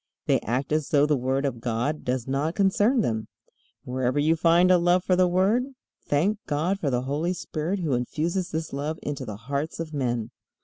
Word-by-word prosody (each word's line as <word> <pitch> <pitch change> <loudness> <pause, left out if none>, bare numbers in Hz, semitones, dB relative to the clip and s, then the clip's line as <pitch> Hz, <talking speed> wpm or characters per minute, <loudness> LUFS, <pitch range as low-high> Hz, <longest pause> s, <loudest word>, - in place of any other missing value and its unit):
They - - +3
act 130 +5 -2
as 155 -1 0
though 145 -1 +4
the 150 0 +2
Word 135 +2 0
of 120 -4 -3
God 120 +6 -1
does 125 -1 -2
not 145 +5 -1
concern 205 +5 +3
them. 110 - -2 0.6
Wherever 130 +1 -1
you 155 +3 +3
find 170 +2 +4
a 180 - +6
love 175 +1 +3
for 185 - +2
the 180 0 +4
Word, 215 +9 +1 0.3
thank 190 +9 +1
God 165 +7 0
for 150 - 0
the 125 -1 0
Holy 150 +7 -1
Spirit 175 +2 -3
who 155 -5 0
infuses 165 +9 -1
this 160 -1 -4
love 150 +3 -3
into 140 -3 -4
the 105 -3 -6
hearts 140 +9 -4
of 160 -2 -5
men. 120 -5 -2
150 Hz, 200 wpm, -26 LUFS, 130-175 Hz, 0.6 s, a